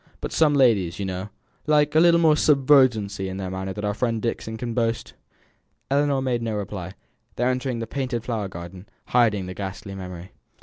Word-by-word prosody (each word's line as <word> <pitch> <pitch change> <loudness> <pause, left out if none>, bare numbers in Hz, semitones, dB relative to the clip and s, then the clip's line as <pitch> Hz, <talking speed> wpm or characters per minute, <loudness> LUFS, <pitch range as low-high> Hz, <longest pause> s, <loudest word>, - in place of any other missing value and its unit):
But - - -5
some 150 -2 +3
ladies, 105 -10 +3
you 100 - -3
know, 95 +2 -4 0.4
like 150 -1 +3
a 155 - +5
little 170 0 +6
more 160 -2 +5
subserviency 130 -10 +3
in 95 - -5
manner 95 0 -4
than 105 +2 -5
our 105 - 0
friend 115 +1 -1
Dixon 110 0 -3
can 120 0 -4
boast." 115 -1 -1 0.8
Ellinor 140 -1 +2
made 125 -3 0
no 115 -2 -2
reply. 95 -3 -5 0.4
They 120 - -1
were 125 - +3
entering 130 -1 -2
the 115 - -3
painted 125 -1 -3
flower 115 -5 -2
garden, 90 +2 -10 0.2
hiding 110 -6 +3
the 90 - -6
ghastly 100 +1 -6
memory. 90 -1 -8
115 Hz, 185 wpm, -24 LUFS, 95-130 Hz, 0.8 s, little